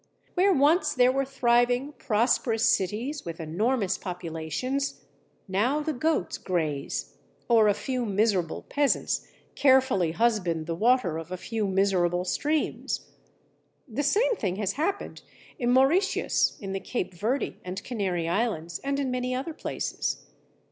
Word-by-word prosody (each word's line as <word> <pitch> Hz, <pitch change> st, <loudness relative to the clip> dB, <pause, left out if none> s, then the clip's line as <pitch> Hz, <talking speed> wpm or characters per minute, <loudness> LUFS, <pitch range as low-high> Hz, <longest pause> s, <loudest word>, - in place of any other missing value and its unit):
Where 390 Hz, +2 st, +4 dB
once 305 Hz, 0 st, +3 dB
there 250 Hz, 0 st, +5 dB
were 275 Hz, +1 st, 0 dB
thriving, 245 Hz, +1 st, +2 dB
prosperous 225 Hz, -1 st, +2 dB
cities 225 Hz, +9 st, 0 dB
with 165 Hz, -1 st, -6 dB
enormous 195 Hz, +6 st, 0 dB
populations, 180 Hz, -, -3 dB, 0.4 s
now 230 Hz, +10 st, +1 dB
the 310 Hz, +1 st, -2 dB
goats 300 Hz, -, 0 dB
graze 155 Hz, -6 st, -2 dB, 0.3 s
or 225 Hz, -3 st, +5 dB
a 205 Hz, -, +3 dB
few 255 Hz, +2 st, -2 dB
miserable 200 Hz, -4 st, +1 dB
peasants 285 Hz, -1 st, 0 dB, 0.3 s
carefully 260 Hz, -, +3 dB
husband 180 Hz, -8 st, +1 dB
the 165 Hz, -, -2 dB
water 210 Hz, -4 st, +2 dB
of 165 Hz, +2 st, -9 dB
a 185 Hz, -, -3 dB
few 220 Hz, +2 st, -2 dB
miserable 185 Hz, -2 st, +1 dB
streams. 300 Hz, -, -1 dB, 0.8 s
The 250 Hz, +3 st, -2 dB
same 450 Hz, -, +2 dB
thing 185 Hz, -4 st, -1 dB
has 200 Hz, -1 st, -1 dB
happened 360 Hz, -, -2 dB, 0.4 s
in 240 Hz, -2 st, +1 dB
Mauritius, 275 Hz, +10 st, +3 dB
in 195 Hz, -1 st, -5 dB
the 195 Hz, -, -2 dB
Cape 195 Hz, 0 st, -3 dB
Verde 225 Hz, +10 st, -1 dB
and 185 Hz, +1 st, -5 dB
Canary 190 Hz, -8 st, -2 dB
Islands, 175 Hz, -3 st, -1 dB
and 275 Hz, 0 st, -2 dB
in 270 Hz, -2 st, -1 dB
many 250 Hz, 0 st, -1 dB
other 275 Hz, +6 st, -3 dB
places. -, -, -3 dB
230 Hz, 135 wpm, -27 LUFS, 185-270 Hz, 0.8 s, there